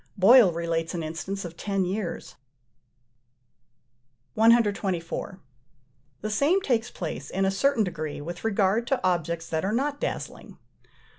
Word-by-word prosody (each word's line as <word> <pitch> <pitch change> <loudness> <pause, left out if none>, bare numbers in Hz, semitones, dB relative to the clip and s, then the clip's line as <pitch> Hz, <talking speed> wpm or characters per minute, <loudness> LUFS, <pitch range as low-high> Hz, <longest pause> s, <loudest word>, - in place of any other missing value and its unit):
Boyle 210 +1 +7
relates 165 0 -2
an 170 - -3
instance 180 +5 -5
of 170 -1 -8
ten 195 0 -1
years. 190 0 -4 2.0
124. 200 -6 +1 0.8
The 215 - -3
same 290 - +3
takes 245 -10 0
place, 155 -4 -6
in 195 +1 0
a 195 - +2
certain 270 +4 +2
degree, 155 -6 -4
with 170 +4 -7
regard 215 +1 +1
to 270 -7 0
objects 170 -2 -1
that 160 -1 -1
are 195 - 0
not 280 +5 -1
dazzling. - - -5
195 Hz, 130 wpm, -26 LUFS, 170-225 Hz, 2.0 s, Boyle